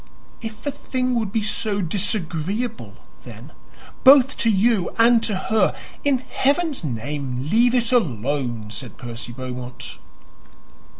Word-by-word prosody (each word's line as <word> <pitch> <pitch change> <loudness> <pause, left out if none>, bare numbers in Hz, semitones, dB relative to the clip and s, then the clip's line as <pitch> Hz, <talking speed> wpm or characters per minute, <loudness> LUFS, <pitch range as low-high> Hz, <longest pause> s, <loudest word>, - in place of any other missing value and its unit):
"If 220 -2 -7
the 285 - -1
thing 255 -2 -2
would 220 -5 -1
be 220 0 0
so 210 -1 -1
disagreeable, 200 +3 -1 0.3
then, - - -11 0.5
both 270 0 +7
to 230 - +2
you 210 -2 +2
and 230 0 +5
to 215 -3 -1
her, 215 +3 +1 0.3
in 265 -3 +1
Heaven's 290 - 0
name 130 0 -4
leave 240 +3 +4
it 240 -1 +1
alone," 125 - -1
said 120 0 -7
Percy 120 -1 -7
Beaumont. 125 0 -7
210 Hz, 125 wpm, -22 LUFS, -, 0.5 s, both